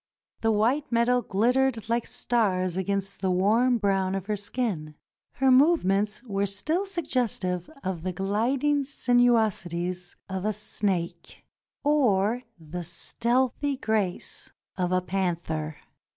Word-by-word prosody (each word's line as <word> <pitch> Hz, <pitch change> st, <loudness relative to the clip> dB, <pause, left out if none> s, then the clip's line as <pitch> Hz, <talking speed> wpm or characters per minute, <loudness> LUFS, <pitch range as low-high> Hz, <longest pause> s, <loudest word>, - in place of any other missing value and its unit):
The 225 Hz, -, +2 dB
white 245 Hz, +8 st, +1 dB
metal 240 Hz, +1 st, +3 dB
glittered 235 Hz, +2 st, +1 dB
like 235 Hz, 0 st, 0 dB
stars 185 Hz, -7 st, 0 dB
against 195 Hz, +1 st, -2 dB
the 190 Hz, -, +1 dB
warm 220 Hz, +7 st, +3 dB
brown 195 Hz, -3 st, +1 dB
of 195 Hz, -1 st, -3 dB
her 210 Hz, +1 st, -1 dB
skin. 200 Hz, -8 st, -3 dB, 0.4 s
Her 265 Hz, +1 st, +3 dB
movements 215 Hz, -, +3 dB
were 200 Hz, -4 st, -1 dB
still 310 Hz, -, -1 dB
suggestive 235 Hz, -, -2 dB
of 185 Hz, -3 st, -3 dB
the 185 Hz, +2 st, -2 dB
gliding 245 Hz, +10 st, +1 dB
sinuosities 215 Hz, -, +1 dB
of 190 Hz, -1 st, -4 dB
a 215 Hz, +1 st, 0 dB
snake, 195 Hz, -4 st, -3 dB, 0.4 s
or 245 Hz, -6 st, +2 dB, 0.2 s
the 165 Hz, +2 st, -6 dB
stealthy 250 Hz, -, 0 dB
grace 215 Hz, -7 st, -1 dB, 0.2 s
of 180 Hz, -1 st, -1 dB
a 185 Hz, 0 st, +2 dB
panther. 170 Hz, -5 st, -2 dB
205 Hz, 120 wpm, -27 LUFS, 185-245 Hz, 0.4 s, metal